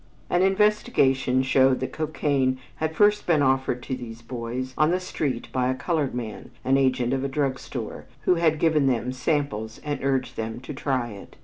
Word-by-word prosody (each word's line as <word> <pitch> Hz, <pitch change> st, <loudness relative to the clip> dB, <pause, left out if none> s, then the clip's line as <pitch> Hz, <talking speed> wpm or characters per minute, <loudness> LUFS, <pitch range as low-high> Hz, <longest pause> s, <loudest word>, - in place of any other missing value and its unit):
An 175 Hz, -, +3 dB
investigation 190 Hz, -, +3 dB
showed 130 Hz, 0 st, +4 dB
that 130 Hz, -, -4 dB
cocaine 145 Hz, -4 st, 0 dB, 0.2 s
had 160 Hz, 0 st, -2 dB
first 210 Hz, +3 st, +3 dB
been 155 Hz, -4 st, +4 dB
offered 130 Hz, -2 st, +1 dB
to 130 Hz, -, -3 dB
these 120 Hz, -2 st, -9 dB
boys 125 Hz, +2 st, -4 dB
on 155 Hz, 0 st, +3 dB
the 180 Hz, +2 st, +2 dB
street 145 Hz, -9 st, -3 dB
by 125 Hz, -1 st, +1 dB
a 130 Hz, -, 0 dB
colored 150 Hz, -3 st, -1 dB
man, 115 Hz, -4 st, -6 dB, 0.2 s
an 130 Hz, +1 st, +4 dB
agent 130 Hz, -2 st, +2 dB
of 135 Hz, 0 st, -1 dB
a -, -, 0 dB
drug 135 Hz, -2 st, -1 dB
store, 120 Hz, -5 st, -6 dB, 0.2 s
who 165 Hz, -, +3 dB
had 165 Hz, -2 st, +2 dB
given 155 Hz, -3 st, +3 dB
them 125 Hz, -1 st, 0 dB
samples 130 Hz, -5 st, -2 dB
and 145 Hz, -2 st, -3 dB
urged 135 Hz, -2 st, 0 dB
them 110 Hz, +1 st, -4 dB
to 140 Hz, +3 st, -7 dB
try 130 Hz, -3 st, -1 dB
it. 100 Hz, -1 st, -11 dB
130 Hz, 190 wpm, -25 LUFS, 125-155 Hz, 0.2 s, showed